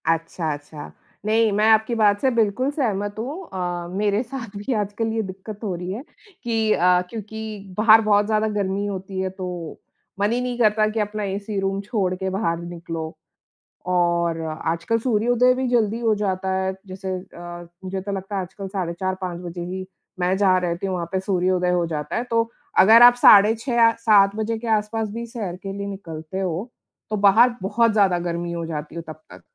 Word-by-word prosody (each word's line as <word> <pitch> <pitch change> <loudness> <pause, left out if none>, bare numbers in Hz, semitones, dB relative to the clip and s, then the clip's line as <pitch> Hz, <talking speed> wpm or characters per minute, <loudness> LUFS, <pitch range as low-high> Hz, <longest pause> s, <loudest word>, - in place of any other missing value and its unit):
अच्छा, 165 0 -1
अच्छा। 145 +1 -9 0.3
नहीं, 220 0 +3
मैं 210 +2 +2
आपकी 220 +2 +3
बात 205 -2 +3
से 265 - +3
बिल्कुल 230 +4 +1
सहमत 205 -8 -1
हूँ। 285 +11 -5
अ, 175 -2 -3
मेरे 205 +1 +1
साथ 235 -4 -8
भी 205 +6 -2
आजकल 210 +1 -1
ये 225 - 0
दिक्कत 195 +2 -8
हो 200 -4 -2
रही 180 +1 -5
है 225 +7 -5 0.4
कि 225 -2 +1
अ, 180 0 +4
क्योंकि 215 -2 -7
बाहर 220 +1 +7
बहुत 205 -1 +3
ज़्यादा 215 0 +1
गर्मी 195 +1 -1
होती 195 -1 -5
है, 190 0 -1
तो 180 -3 -6 0.4
मन 205 +2 +2
ही 245 +1 0
नहीं 250 -1 -3
करता 215 -1 +4
कि 215 +1 -2
अपना 210 0 -2
एसी 200 +1 -3
रूम 195 0 -1
छोड़ 200 -3 -1
के 190 +1 -3
बाहर 190 -3 -1
निकलो। 165 -2 -6 0.7
और 170 -2 +1
आजकल 165 +6 -1
सूर्योदय 245 +2 +3
भी 260 0 -1
जल्दी 230 -2 +1
हो 225 -2 +2
जाता 190 -2 -1
है, 190 0 0
जैसे 190 +1 -6 0.3
अ, 175 0 -8 0.2
मुझे 190 0 -4
तो 200 +2 -5
लगता 195 +1 -4
है, 195 - 0
आज 185 0 -8
कल 195 -1 -6
साढ़े 185 -3 -3
4-5 185 -2 -3
बजे 175 0 -6
ही, 185 +1 -5 0.3
मैं 180 +1 +2
जहाँ 190 -2 +4
रहती 175 +2 -2
हूँ, 190 - -2
वहाँ 170 -2 -3
पे 190 - 0
सूर्योदय 185 -1 +1
हो 175 -1 +1
जाता 150 -2 -4
है। 235 - 0
तो 230 0 +2 0.3
अगर 225 +4 +8
आप 245 0 +10
साढ़े 215 -3 +7
6 245 +2 -3
या 230 -1 +6
7 205 -3 +5
बजे 220 +1 -2
के 235 +1 -7
आसपास 215 +1 -3
भी 235 +2 -5
सैर 215 -7 -5
के 195 - -4
लिए 200 0 -5
निकलते 175 -3 -6
हो, 190 +4 -3 0.4
तो 215 - -1
बाहर 220 +5 +5
बहुत 220 +4 +2
ज़्यादा 195 -4 +3
गर्मी 170 0 -3
हो 170 -1 -3
जाती 155 -1 -6
है 170 - -4
तब 155 -1 -11
तक। - - -12
200 Hz, 200 wpm, -22 LUFS, 180-220 Hz, 0.7 s, आप